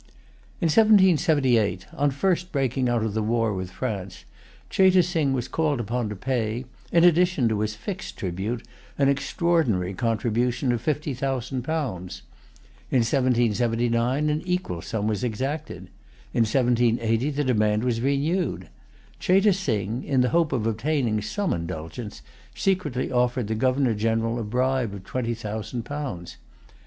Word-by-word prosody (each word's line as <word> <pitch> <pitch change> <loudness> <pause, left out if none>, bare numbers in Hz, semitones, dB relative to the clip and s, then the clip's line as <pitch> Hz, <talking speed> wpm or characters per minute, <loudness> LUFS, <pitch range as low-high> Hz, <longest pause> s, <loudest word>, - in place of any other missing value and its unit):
In 170 - -1
1778, 155 - +4
on 145 +1 +1
the 135 - -6
first 180 +3 0
breaking 130 -2 0
out 120 -2 +1
of 110 -2 -2
the 110 - 0
war 115 0 +1
with 95 -1 -4
France, 95 - -5 0.4
Cheyte 185 -2 +4
Sing 160 -6 0
was 130 -2 -1
called 155 -5 0
upon 120 0 -2
to 105 - -5
pay, 120 +1 -2 0.3
in 170 - +4
addition 175 -6 +4
to 110 -2 0
his 110 0 -1
fixed 190 - -6
tribute, 100 +6 -3 0.3
an 140 -1 +3
extraordinary 140 - +1
contribution 120 +3 0
of 120 -2 -1
fifty 150 +1 -1
thousand 130 0 -2
pounds. 95 - -4 0.7
In 130 - +3
1779 120 +2 +1
an 150 +1 -1
equal 180 - -2
sum 110 +1 -3
was 105 -1 -1
exacted. 135 +7 -3 0.5
In 115 - +3
1780 120 0 +2
the 145 0 -1
demand 110 -4 +2
was 120 -2 0
renewed. 145 +7 0 0.5
Cheyte 195 +2 +4
Sing, 115 - -2
in 130 -2 +1
the 125 - +2
hope 165 -2 +2
of 120 -5 -1
obtaining 115 -1 0
some 180 - -1
indulgence, 85 - -6 0.3
secretly 155 -10 -1
offered 125 -1 +1
the 110 - -1
Governor 130 +2 +2
General 115 +2 0
a - - -2
bribe 125 0 0
of 95 - -9
twenty 120 +2 -2
thousand 110 +2 -5
pounds. 135 -11 -6
125 Hz, 145 wpm, -25 LUFS, 110-145 Hz, 0.7 s, 1778